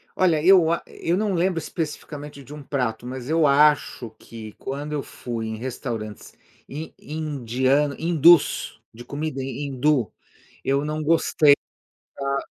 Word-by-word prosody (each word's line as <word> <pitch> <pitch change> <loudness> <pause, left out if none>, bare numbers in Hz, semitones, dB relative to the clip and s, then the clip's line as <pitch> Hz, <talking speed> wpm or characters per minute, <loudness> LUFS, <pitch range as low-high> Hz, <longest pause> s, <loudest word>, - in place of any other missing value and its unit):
Olha, 165 -5 +2
eu 175 -3 +6
a 170 - 0
eu 170 +2 -2
não 210 -1 0
lembro 180 0 +1
especificamente 150 -3 -6
de 140 +3 -11
um 150 -1 -9
prato, 125 -5 -2
mas 130 +1 -6
eu 160 -1 +3
acho 145 -4 +3
que 110 -2 -10
quando 145 +3 -5
eu 145 -2 -2
fui 115 -2 -6
em 110 0 -4
restaurantes 115 -3 -6 0.3
in 150 +4 -7
indiano, 140 -2 0
hindus, 170 -1 +4
de 120 +2 -11
comida 145 -1 -4
hindu, 135 -2 0 0.5
eu 140 +1 +1
não 155 +1 -3
gostei 155 -2 +4 0.8
da 140 0 +1
145 Hz, 140 wpm, -23 LUFS, 130-155 Hz, 0.8 s, eu